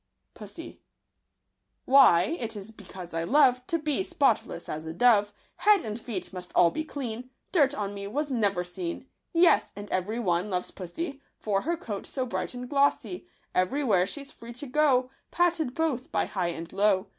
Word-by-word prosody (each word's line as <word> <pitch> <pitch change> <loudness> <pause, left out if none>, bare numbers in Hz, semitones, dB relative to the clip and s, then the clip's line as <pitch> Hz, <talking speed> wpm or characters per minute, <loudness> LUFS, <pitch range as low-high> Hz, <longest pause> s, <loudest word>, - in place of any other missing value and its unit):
Pussy. - - -10 0.5
— - - -52
Why? 255 - +6
it 230 -2 -4
is 205 +1 -8
because 185 -5 -11
I 165 0 -1
love 250 - +4
To 335 - +1
be 305 +1 -1
spotless 285 - 0
as 155 +1 -5
a 160 - -5
dove; 205 -1 +4 0.3
Head 415 - +4
and 215 +1 -5
feet 205 -5 -5
must 180 -1 -7
all 170 -1 +6
be 315 - -3
clean, 250 -5 -6 0.2
Dirt 290 -5 +3
on 205 -5 -3
me 200 0 -6
was 290 +7 -2
never 200 -7 +1
seen. 175 +3 -5 0.3
Yes! 340 0 +4
and 205 +1 -7
every 205 +5 -1
one 180 -2 0
loves 180 -2 -2
pussy 280 - -6 0.2
For 200 -2 0
her 340 +7 -1
coat 215 - -6
so 260 -2 -2
bright 250 - -4
and 250 0 -6
glossy; 285 +6 +1 0.3
Every 185 +11 +1
where 190 -7 +3
she's 280 +6 -7
free 235 +1 -11
to 250 +5 -7
go, 260 -2 +2 0.2
Patted 335 -7 +1
both 295 -6 -1
by - - +1
high 185 -3 -2
and 170 0 -6
low. 195 -1 +3
235 Hz, 180 wpm, -28 LUFS, 190-285 Hz, 0.5 s, Why